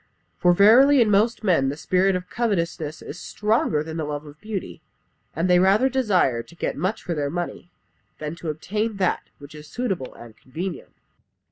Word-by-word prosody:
For 180 - +5
verily 240 +10 +6
in 220 -3 +4
most 220 +3 +2
men 165 -10 +3
the 145 - -4
spirit 185 +5 +2
of 180 0 -4
covetousness 170 -9 -2
is 165 - -8
stronger 210 -8 0
than 160 +1 -6
the 160 - -2
love 150 0 -4
of 150 +1 -14
beauty, 210 -3 -6 0.5
and 165 +3 0
they 180 -1 +5
rather 200 +8 +4
desire 195 - +1
to 170 - -17
get - - -3
much 185 +8 -2
for 175 - -3
their 145 -3 -2
money, 175 +2 -5 0.5
than 150 0 -5
to 170 - -5
obtain 210 +8 -3
that 185 -2 +1 0.2
which 145 +1 -13
is 150 0 -11
suitable 195 - -3
and 115 -2 -13
convenient." 170 - -7
180 Hz, 180 wpm, -23 LUFS, 150-210 Hz, 0.5 s, verily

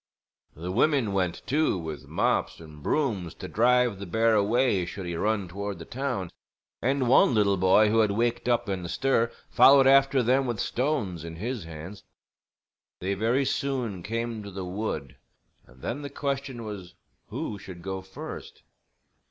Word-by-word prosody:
The 85 +4 -5
women 120 -1 +2
went, 90 -3 -1
too, 150 -6 +1
with 80 -3 -6
mops - - 0
and 75 -2 -12
brooms 100 - -1
to 95 - -7
drive 120 0 +3
the 100 - -6
bear 115 +5 +2
away 110 -1 +2
should 90 +2 -6
he 85 -1 -3
run 105 +1 0
toward 100 +2 -5
the 85 - -9
town; 125 -9 -3 0.5
and 130 0 +1
one 125 0 +5
little 100 -2 +3
boy 95 +3 +4
who 115 +2 +3
had 110 -2 +4
waked 120 +4 0
up 120 -1 +1
in 95 -2 -2
the 85 - -6
stir 120 -1 +1 0.2
followed 135 0 +7
after 135 -1 +5
them 130 +3 +2
with 120 -4 -2
stones 120 - -1
in 85 -1 -7
his 110 +2 -4
hands. 85 +5 -9 1.0
They 95 +2 -1
very 115 +7 +1
soon 125 -10 -2
came 115 +2 -3
to 100 - -8
the 95 -1 -6
wood, 90 - -4 0.5
and 65 -1 -19
then 130 +5 -3
the 140 - -6
question 140 -3 -3
was 100 -4 -8 0.3
who 100 - -5
should 95 -4 -10
go 95 0 -4
first. 95 0 -9
105 Hz, 170 wpm, -27 LUFS, 95-125 Hz, 1.0 s, followed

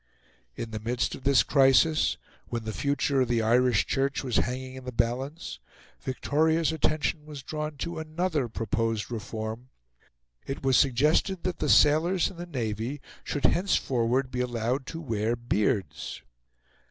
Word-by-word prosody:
In 115 -1 -5
the 110 - -4
midst 120 +3 -1
of 130 - -9
this 140 -1 +5
crisis, 140 +3 +4 0.3
when 115 -1 -3
the 110 0 -4
future 140 0 +1
of 130 - +2
the 115 -1 +1
Irish 120 -1 +3
Church 140 +1 0
was 125 -4 0
hanging 130 +1 -2
in 130 0 -9
the 125 - -5
balance, 130 +7 -2 0.4
Victoria's 160 +5 +1
attention 155 0 -1
was 145 -3 -8
drawn 150 +1 -4
to 170 +4 -4
another 160 -3 -1
proposed 115 0 -2
reform. 110 +2 -5 0.8
It 135 0 -4
was 135 -1 +3
suggested 150 - +3
that 185 - -2
the 150 - 0
sailors 160 +8 +4
in 185 - -14
the 175 +1 -6
Navy 120 - -3 0.2
should 145 -2 -2
henceforward 130 -8 +1
be 125 - -3
allowed 125 +2 -1
to 165 - -5
wear 115 -6 -1
beards. 105 - -1
130 Hz, 150 wpm, -27 LUFS, 115-150 Hz, 0.8 s, this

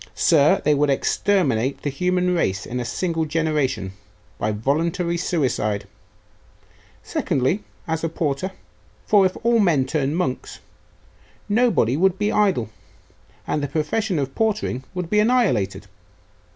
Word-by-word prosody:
Sir, 165 +4 +4
they 150 - +4
would 145 0 +2
exterminate 140 - +1
the 145 - -1
human 180 +4 0
race 105 - 0
in 125 - -4
a 120 - -3
single 165 +5 -1
generation, 150 -11 -1 0.5
by 105 - 0
a - - -1
voluntary 165 - 0
suicide! 125 - -1 1.2
Secondly, 135 +11 -1 0.2
as 160 0 -2
a 165 - 0
porter; 155 +3 -2 0.5
for 200 -3 +5
if 185 - -8
all 235 0 +3
men 165 -10 +3
turned 145 +2 -1
monks, 130 -8 -3 0.9
nobody 215 - +2
would 190 +3 +2
be 210 +1 0
idle, 185 - +1 0.7
and 150 - -1
the 145 - -1
profession 165 +7 -1
of 135 -2 -2
portering 215 - -1
would 180 -2 -3
be 210 +4 +2
annihilated. 125 - +1
160 Hz, 135 wpm, -22 LUFS, 130-185 Hz, 1.2 s, for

